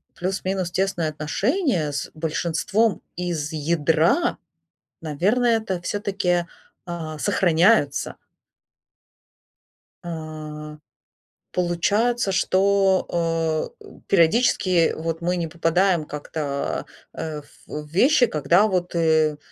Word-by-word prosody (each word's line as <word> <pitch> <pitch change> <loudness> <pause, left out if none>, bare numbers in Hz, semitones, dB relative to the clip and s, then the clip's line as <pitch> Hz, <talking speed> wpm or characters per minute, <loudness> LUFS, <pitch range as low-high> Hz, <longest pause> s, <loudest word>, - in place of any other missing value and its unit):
плюс-минус 185 0 -2
тесные 180 -4 0
отношения 175 - 0
с 145 - -4
большинством 170 +6 0
из 170 -4 -3
ядра, 165 - +2 0.7
наверное, 215 - +2
это 190 -5 -4
всё-таки, 190 -3 -1 0.4
а, 160 -3 -5
сохраняются. 175 -3 +2 1.9
А, 155 -2 -7 0.7
получается, 200 +6 +1
что, 185 -5 +1
э, - - -13 0.2
периодически 180 -1 +3
вот 165 +1 -3
мы 180 +1 0
не 170 - -2
попадаем 170 +2 +1
как-то, 145 -1 -4 0.3
а, 155 -2 -5 0.3
в 150 0 -6
вещи, 250 - +4
когда 175 - +3
вот, 180 -3 -1
э, 160 -2 +2
170 Hz, 85 wpm, -23 LUFS, 155-195 Hz, 1.9 s, вещи